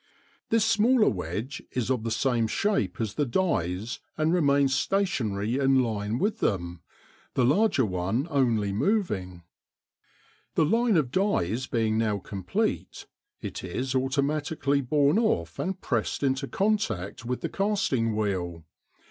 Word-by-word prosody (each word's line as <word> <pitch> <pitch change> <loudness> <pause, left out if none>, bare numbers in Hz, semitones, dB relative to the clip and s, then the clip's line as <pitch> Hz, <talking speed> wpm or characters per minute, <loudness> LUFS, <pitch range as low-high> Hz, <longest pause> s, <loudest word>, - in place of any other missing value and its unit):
This 225 -1 +3
smaller 225 +1 +4
wedge 100 - -4
is 125 0 -1
of 125 -4 0
the 115 - -2
same 115 0 +1
shape 155 - 0
as 110 -3 -2
the 150 - 0
dies 115 - -1 0.2
and 155 +2 +2
remains 140 -5 +3
stationary 130 - 0
in 135 -1 +4
line 110 -1 -2
with 205 - 0
them, 85 -4 -1 0.5
the 125 - +3
larger 150 - +3
one 95 - -1
only 115 -8 +1
moving. 100 - -1 1.1
The 160 - +4
line 225 +3 +3
of 135 -6 +1
dies 130 - 0
being 110 -2 +1
now 110 -2 +1
complete, 95 -2 -3 0.4
it - - -5
is 125 +9 -3
automatically 140 +2 0
borne 145 - +3
off 85 - 0
and 190 0 -2
pressed - - -1
into 135 0 0
contact 130 - -1
with 125 +1 -3
the - - -2
casting 195 - 0
wheel. 90 -6 -2
130 Hz, 135 wpm, -27 LUFS, 105-155 Hz, 1.1 s, smaller